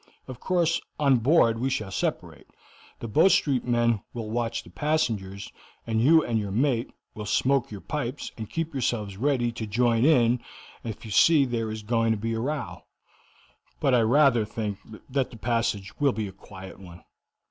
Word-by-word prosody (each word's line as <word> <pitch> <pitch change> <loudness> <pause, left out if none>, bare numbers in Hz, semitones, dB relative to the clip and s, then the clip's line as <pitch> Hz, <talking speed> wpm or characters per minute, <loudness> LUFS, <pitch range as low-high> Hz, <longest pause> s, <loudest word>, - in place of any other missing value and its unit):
Of 130 -2 -8
course, 170 -1 +1 0.2
on 140 -3 +4
board 115 -2 +3
we 130 +3 0
shall 110 -6 -3
separate. - - -3 0.5
The 115 - -4
Bow 155 - +4
Street 140 -9 +2
men 120 -3 +1
will 110 -2 -5
watch 115 0 -2
the - - -15
passengers, 110 -11 -2 0.3
and 110 -1 0
you 160 +5 +5
and 115 -2 0
your 105 -2 -4
mate 120 +3 0 0.2
will 105 -1 -7
smoke 135 +3 +1
your 100 -3 -8
pipes 145 -3 -4
and 110 -2 -7
keep 165 -1 -3
yourselves 115 -6 -2
ready 125 -1 +1
to 115 -1 -6
join 115 +2 +2
in 125 -5 +4 0.4
if 115 0 -7
you 110 - -8
see 150 +6 +5
there 115 -3 -2
is 110 0 -6
going 115 +1 +1
to - - -3
be 115 +2 -3
a 115 - -2
row. 145 +5 -4 0.9
But 135 - +2
I 120 - +5
rather 120 0 +4
think 105 -1 -4 0.3
that 135 -1 -1
the 115 - -12
passage 115 -4 -1
will 140 -2 +3
be 105 0 -3
a - - -8
quiet 95 0 -12
one. 90 -2 -13
115 Hz, 180 wpm, -26 LUFS, 110-135 Hz, 0.9 s, you